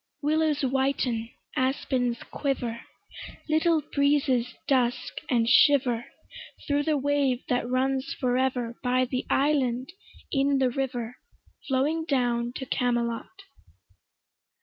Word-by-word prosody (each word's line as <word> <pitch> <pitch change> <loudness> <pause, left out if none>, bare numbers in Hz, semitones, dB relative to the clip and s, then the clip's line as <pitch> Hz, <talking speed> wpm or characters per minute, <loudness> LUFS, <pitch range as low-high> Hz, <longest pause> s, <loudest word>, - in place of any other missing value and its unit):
Willows 305 0 +1
whiten, 265 -3 0 0.3
aspens 255 -2 0
quiver, 245 -5 -2 0.6
Little 315 0 +2
breezes 275 -4 +2
dusk 250 -3 0
and 230 -2 +2
shiver 250 -3 +4 0.6
Thro' 285 0 +1
the 300 0 +1
wave 275 -2 +1
that 245 -1 0
runs 265 +1 0
for 250 -2 +1
ever 250 -2 -1
By 255 0 +2
the 255 0 -3
island 265 -1 +1 0.4
in 275 0 +2
the 260 -2 +2
river 245 -2 -3 0.5
Flowing 295 +5 0
down 240 -5 0
to 265 - -5
Camelot. 240 +9 -2
260 Hz, 105 wpm, -27 LUFS, 245-285 Hz, 0.6 s, shiver